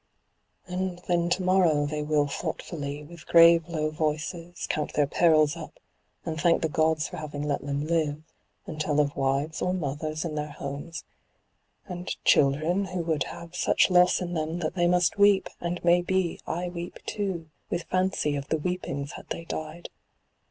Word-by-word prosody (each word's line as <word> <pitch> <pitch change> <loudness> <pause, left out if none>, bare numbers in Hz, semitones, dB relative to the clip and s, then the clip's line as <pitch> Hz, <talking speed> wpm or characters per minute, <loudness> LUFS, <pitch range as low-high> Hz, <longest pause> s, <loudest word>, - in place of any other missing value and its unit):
And 180 -1 -3
then 175 -1 +2
to 185 +1 +1
morrow 180 -5 +3
they 150 +1 -3
will 150 -1 +2
thoughtfully, 145 0 -4
with 165 +1 -13
grave 170 0 +7
low 155 -2 -1
voices, 155 +3 -3
count 155 - -2
their 145 - +4
perils 155 0 +4
up, 165 -2 -9 0.5
and 160 -1 -3
thank 170 -2 +3
the 160 - +1
gods 155 0 +1
for - - -8
having 145 -1 -5
let 150 -1 -1
them 140 +1 -2
live, 155 -2 0 0.4
and 155 -1 -5
tell 150 -1 +1
of 145 -1 +1
wives 140 +3 0
or 180 +1 +1
mothers 155 0 -3
in 160 - -3
their 150 -1 -4
homes, 140 +4 -6 0.8
and 180 -1 -5
children, 155 +8 +3
who 180 -2 -3
would 160 -3 0
have 170 +1 -9
such 180 - +3
loss 180 0 +5
in 175 -1 -3
them 160 0 -2
that 160 -2 -2
they 175 -1 +2
must 180 +2 +2
weep, 200 -1 +5
and 175 0 -3
may 175 +1 +5
be 185 -1 0
I 175 +2 -2
weep 175 0 -6
too, 185 -6 -3 0.2
with 170 - -2
fancy 185 -6 0
of 140 0 -4
the 160 - +1
weepings 150 -4 -3
had - - -11
they 165 - -5
died. 155 +1 -6
160 Hz, 175 wpm, -27 LUFS, 150-175 Hz, 0.8 s, grave